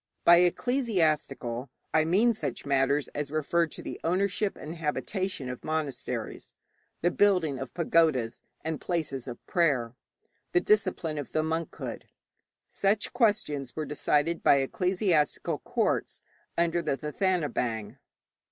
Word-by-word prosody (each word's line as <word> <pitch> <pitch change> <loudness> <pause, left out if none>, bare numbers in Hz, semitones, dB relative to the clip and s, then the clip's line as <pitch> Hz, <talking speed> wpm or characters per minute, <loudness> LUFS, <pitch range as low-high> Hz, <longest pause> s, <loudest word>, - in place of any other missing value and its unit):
By 170 0 +9
'ecclesiastical' 170 - +1 0.2
I 155 0 +4
mean 210 +8 +4
such 145 - -4
matters 140 +1 +2
as 145 -1 -4
referred 160 +2 +1
to - - -9
the - - -6
ownership 195 +4 0
and 160 +3 -7
habitation 165 0 -2
of 125 -1 -6
monasteries, 155 -3 -3 0.5
the 175 - +2
building 180 -10 +3
of 130 -2 -7
pagodas 155 -8 +2 0.2
and 160 -1 -3
places 145 -7 -2
of 120 - -8
prayer, 135 -9 +1 0.6
the - - +5
discipline 180 -6 +1
of 145 - -7
the 155 - +2
monkhood. 160 +1 -4 0.6
Such 205 +2 0
questions 205 - +1
were 155 - -2
decided 150 +3 +1
by - - +6
ecclesiastical 175 +2 +1
courts - - -1 0.3
under 170 0 +2
the 150 -4 -1
Thathanabaing. 150 - -1
160 Hz, 125 wpm, -28 LUFS, 140-180 Hz, 0.6 s, By